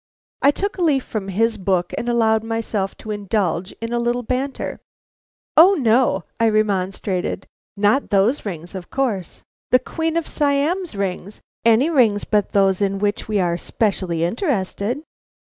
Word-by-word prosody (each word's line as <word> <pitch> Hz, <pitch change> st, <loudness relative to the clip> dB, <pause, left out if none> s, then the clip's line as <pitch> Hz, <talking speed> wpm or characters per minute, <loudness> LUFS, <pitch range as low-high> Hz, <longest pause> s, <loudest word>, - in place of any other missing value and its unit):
I 280 Hz, -, +6 dB
took 395 Hz, +6 st, -2 dB
a -, -, -1 dB
leaf 290 Hz, -6 st, +2 dB
from 210 Hz, -3 st, -5 dB
his 220 Hz, +3 st, 0 dB
book, 185 Hz, -2 st, 0 dB
and 240 Hz, -, -3 dB
allowed 220 Hz, -2 st, +2 dB
myself 225 Hz, -3 st, -2 dB
to 220 Hz, -, -7 dB
indulge 200 Hz, -3 st, -1 dB
in 230 Hz, +1 st, -6 dB
a 240 Hz, -, +1 dB
little 240 Hz, +1 st, 0 dB
banter. 260 Hz, +4 st, -3 dB, 0.8 s
"O, 360 Hz, +6 st, +8 dB
no," 235 Hz, -, +2 dB, 0.2 s
I 230 Hz, -1 st, +4 dB
remonstrated, 195 Hz, -3 st, -1 dB, 0.3 s
"not 210 Hz, +7 st, +2 dB
those 205 Hz, +7 st, +2 dB
rings, 175 Hz, -4 st, -6 dB
of 185 Hz, -2 st, -7 dB
course. 225 Hz, -10 st, -2 dB, 0.3 s
The 255 Hz, -, +6 dB
Queen 325 Hz, +5 st, -2 dB
of 335 Hz, -, -1 dB
Siam's 295 Hz, -, 0 dB
rings, 195 Hz, +1 st, -4 dB, 0.2 s
any 230 Hz, +8 st, +4 dB
rings 225 Hz, -9 st, +3 dB
but 210 Hz, -2 st, +1 dB
those 195 Hz, -1 st, +2 dB
in 195 Hz, -1 st, +1 dB
which 205 Hz, +1 st, -1 dB
we 210 Hz, -2 st, 0 dB
are 175 Hz, -2 st, +1 dB
specially 185 Hz, -7 st, -1 dB
interested." 225 Hz, -, -1 dB
220 Hz, 155 wpm, -21 LUFS, 195-255 Hz, 0.8 s, O